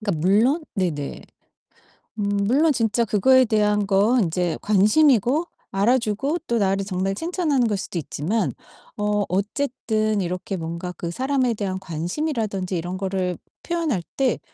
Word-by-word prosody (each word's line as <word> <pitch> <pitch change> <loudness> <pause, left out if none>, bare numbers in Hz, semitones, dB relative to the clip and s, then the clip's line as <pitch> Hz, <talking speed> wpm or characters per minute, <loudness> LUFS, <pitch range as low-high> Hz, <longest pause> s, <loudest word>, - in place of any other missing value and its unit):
그러니까 200 -8 -2
물론 250 - +3
네네. 165 -8 -2 1.0
음 - - 0 0.2
물론 295 +7 +3
진짜 230 -1 +1
그거에 260 +5 +4
대한 210 -2 +1
건 205 +4 +3
이제 175 0 -1
관심이고 245 - +3 0.3
알아주고 235 - +1
또 235 - +1
나를 195 -2 +1
정말 195 0 -1
칭찬하는 310 - 0
거일 210 - 0
수도 190 - -5
있지만 180 +9 -1 0.5
어 210 0 +1
어쨌든 215 +1 -1
이렇게 180 +2 -3
뭔가 170 +2 -5
그 170 - -4
사람에 260 +3 0
대한 195 -3 -3
관심이라든지 195 - -3
이런 175 +2 -4
거를 185 -2 -2 0.3
표현할 325 - -1
때 265 -3 +1
210 Hz, 305 characters per minute, -23 LUFS, 185-255 Hz, 1.0 s, 그거에